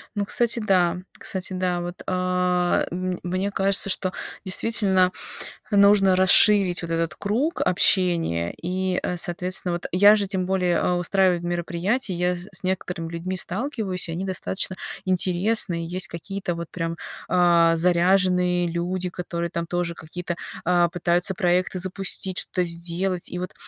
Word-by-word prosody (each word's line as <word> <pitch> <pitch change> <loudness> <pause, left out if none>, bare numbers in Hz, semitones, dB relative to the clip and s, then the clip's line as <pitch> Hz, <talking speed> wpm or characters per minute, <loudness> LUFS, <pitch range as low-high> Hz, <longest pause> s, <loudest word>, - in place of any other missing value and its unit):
Ну, 205 -1 -1
кстати, 235 +2 -1
да 180 -4 +1 0.2
кстати, 190 0 -6
да. 180 -1 -1
Вот, 175 +1 -7
а, 180 -1 0
мн 185 0 -4
мне 185 +3 -2
кажется, 195 0 +4
что 185 -1 +2 0.3
действительно 190 -2 +4 0.6
нужно 200 -2 +5
расширить 190 -1 +6
вот 165 - -5
этот 165 -1 -2
круг 245 +11 -2
общения. 170 - +1
И, 185 +1 -2
э, 180 - -3
соответственно, 180 +1 0
вот 175 - -5
я 205 +4 +6
же 200 -1 -1
тем 185 -2 -2
более, 180 -2 0
а, 180 - 0
устраиваю 180 0 +1
мероприятия. 175 +6 -2
Я 180 +1 -1
з 175 +3 -8
с - - -2
некоторыми 180 -3 -3
людьми 180 +3 -4
сталкиваюсь, 200 - -2
и - - -3
они 180 +4 -4
достаточно 185 0 -3 0.3
интересные. 185 -1 +2
Есть 185 +2 -2
какие-то 185 +2 -5
вот 170 0 -6
прям, 165 -1 -4 0.3
а, 170 -2 +3
заряженные 180 0 +2
люди, 180 +2 -3
которые 170 -1 -5
там 170 +1 -4
тоже 170 0 -3
какие-то, 175 +2 -6 0.3
а, 175 0 +2
пытаются 175 +2 0
проекты 185 0 0
запустить, 185 0 0
что-то 180 - -1
сделать. 175 +2 -3
И 180 - -4
вот 180 +1 -6
180 Hz, 145 wpm, -23 LUFS, 175-190 Hz, 0.6 s, расширить